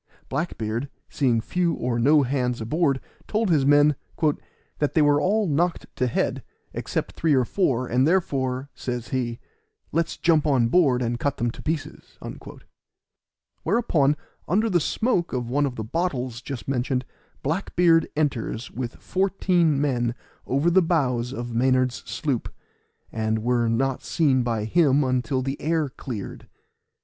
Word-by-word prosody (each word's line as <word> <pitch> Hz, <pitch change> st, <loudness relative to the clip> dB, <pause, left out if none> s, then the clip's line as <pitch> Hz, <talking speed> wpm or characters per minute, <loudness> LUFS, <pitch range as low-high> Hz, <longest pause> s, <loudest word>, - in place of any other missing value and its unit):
Black 155 Hz, +6 st, -2 dB
beard, 115 Hz, +5 st, -3 dB, 0.2 s
seeing 125 Hz, -6 st, +2 dB
few 170 Hz, +8 st, 0 dB
or 120 Hz, -1 st, -1 dB
no 145 Hz, +4 st, +5 dB
hands 125 Hz, -2 st, -1 dB
aboard, 135 Hz, +4 st, +1 dB, 0.3 s
told 215 Hz, -3 st, 0 dB
his 140 Hz, -4 st, +3 dB
men 145 Hz, 0 st, +5 dB, 0.8 s
"that 145 Hz, -, 0 dB
they 160 Hz, -, +5 dB
were 145 Hz, 0 st, +4 dB
all 210 Hz, +3 st, +2 dB
knocked 170 Hz, +2 st, 0 dB
to 125 Hz, -, +1 dB
head, 120 Hz, -, -1 dB, 0.3 s
except -, -, -3 dB
three 160 Hz, -3 st, +1 dB
or 130 Hz, -2 st, +3 dB
four; 130 Hz, -, +1 dB
and 125 Hz, +3 st, +2 dB
therefore," 135 Hz, -7 st, 0 dB
says 120 Hz, -2 st, -5 dB
he, 120 Hz, -3 st, -2 dB, 0.5 s
"let's 165 Hz, +1 st, -1 dB
jump 160 Hz, -3 st, +3 dB
on 125 Hz, -5 st, +3 dB
board 130 Hz, -6 st, +3 dB
and 120 Hz, 0 st, -2 dB
cut 145 Hz, +2 st, -1 dB
them 120 Hz, -1 st, 0 dB
to -, -, -11 dB
pieces." 155 Hz, -1 st, -5 dB, 1.4 s
Whereupon, 160 Hz, -, +2 dB, 0.3 s
under 215 Hz, +5 st, +2 dB
the 175 Hz, -, +4 dB
smoke 180 Hz, +1 st, 0 dB
of 120 Hz, -2 st, -2 dB
one 145 Hz, +2 st, +2 dB
of 130 Hz, -, -5 dB
the 110 Hz, -, -4 dB
bottles 130 Hz, -, -2 dB
just 130 Hz, -1 st, -7 dB
mentioned, 130 Hz, -1 st, -1 dB, 0.4 s
Black 160 Hz, +8 st, -2 dB
beard 165 Hz, -2 st, +4 dB
enters 130 Hz, -6 st, -2 dB
with 120 Hz, -1 st, -5 dB
fourteen 185 Hz, -5 st, +1 dB
men 120 Hz, -5 st, 0 dB, 0.3 s
over 140 Hz, +6 st, +2 dB
the 190 Hz, +2 st, +5 dB
bows 130 Hz, -8 st, 0 dB
of 120 Hz, -3 st, -5 dB
Maynard's 130 Hz, +1 st, +2 dB
sloop, 135 Hz, -7 st, -2 dB, 0.6 s
and 110 Hz, 0 st, -1 dB
were 120 Hz, -1 st, +2 dB
not 130 Hz, +3 st, 0 dB
seen 140 Hz, -6 st, +2 dB
by 115 Hz, -3 st, -1 dB
him 145 Hz, +1 st, +3 dB
until 130 Hz, 0 st, 0 dB
the 135 Hz, +2 st, -4 dB
air 160 Hz, -1 st, 0 dB
cleared. 125 Hz, -6 st, -7 dB
135 Hz, 150 wpm, -24 LUFS, 125-160 Hz, 1.4 s, no